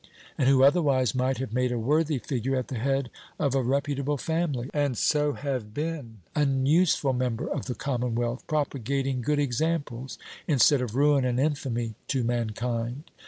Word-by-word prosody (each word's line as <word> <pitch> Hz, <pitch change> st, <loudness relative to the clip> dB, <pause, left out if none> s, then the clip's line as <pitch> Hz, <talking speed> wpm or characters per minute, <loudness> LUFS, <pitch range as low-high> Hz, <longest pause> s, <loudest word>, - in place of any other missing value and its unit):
and 130 Hz, -, +2 dB
who 135 Hz, -1 st, +5 dB
otherwise 140 Hz, -, +4 dB
might 130 Hz, +1 st, 0 dB
have 130 Hz, -4 st, -4 dB
made 125 Hz, 0 st, +1 dB
a 120 Hz, -, -1 dB
worthy 150 Hz, +5 st, +1 dB
figure 130 Hz, 0 st, -2 dB
at 130 Hz, -1 st, -2 dB
the 125 Hz, -, -3 dB
head 135 Hz, 0 st, 0 dB, 0.3 s
of 140 Hz, -4 st, 0 dB
a 135 Hz, -, +2 dB
reputable 140 Hz, +2 st, 0 dB
family, 155 Hz, -5 st, -1 dB
and 145 Hz, -5 st, 0 dB
so 150 Hz, +3 st, +2 dB
have 130 Hz, -8 st, -4 dB
been 145 Hz, -, -4 dB
an 135 Hz, -3 st, +2 dB
useful 150 Hz, -3 st, +3 dB
member 125 Hz, -2 st, -1 dB
of -, -, -3 dB
the 125 Hz, -, -3 dB
commonwealth, 120 Hz, -2 st, -2 dB
propagating 135 Hz, -3 st, -1 dB
good 150 Hz, +4 st, 0 dB
examples, 140 Hz, -2 st, -1 dB, 0.3 s
instead 140 Hz, -2 st, +4 dB
of 120 Hz, -3 st, -4 dB
ruin 145 Hz, 0 st, +4 dB
and 125 Hz, -1 st, 0 dB
infamy, 130 Hz, -6 st, -1 dB
to 135 Hz, -3 st, 0 dB
mankind? 120 Hz, +3 st, -2 dB
135 Hz, 165 wpm, -27 LUFS, 120-145 Hz, 0.3 s, who